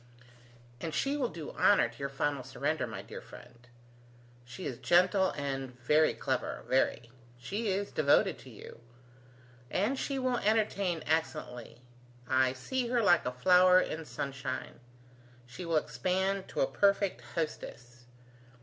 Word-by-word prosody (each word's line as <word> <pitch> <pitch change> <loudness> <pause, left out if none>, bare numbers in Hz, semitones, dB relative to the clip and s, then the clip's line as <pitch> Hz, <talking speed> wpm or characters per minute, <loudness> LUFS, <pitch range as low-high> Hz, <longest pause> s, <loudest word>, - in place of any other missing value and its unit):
And 160 +3 -4
she 275 - 0
will 265 -5 0
do 165 -7 -7
honour 200 -11 +4
to 120 0 -15
your 140 0 -3
final 140 0 -1
surrender, 130 - -2
my - - -7
dear - - -9
friend. 120 0 -15 0.8
She 125 +10 -9
is 120 - -4
gentle, 185 +2 +4
and 135 -3 -4
very 150 +6 +3
clever, 130 -2 -2
very: 120 -2 +1 0.3
she 205 - -4
is 200 +1 -1
devoted 155 +5 +3
to 130 - -13
you: 115 0 -12 1.1
she 275 0 -2
will 255 -2 0
entertain 200 -5 +1
excellently. 150 -7 -3 0.4
I 130 0 +3
see 240 - -2
her 240 -1 +1
like 175 -9 +4
a - - 0
flower 180 +7 +6
in 160 -3 -3
sunshine. 135 +1 -5 0.7
She 120 +9 -8
will 165 -1 +1
expand 185 +9 -1
to - - -3
a - - +5
perfect 200 - +1
hostess. 120 -6 -5
155 Hz, 140 wpm, -31 LUFS, 130-195 Hz, 1.1 s, flower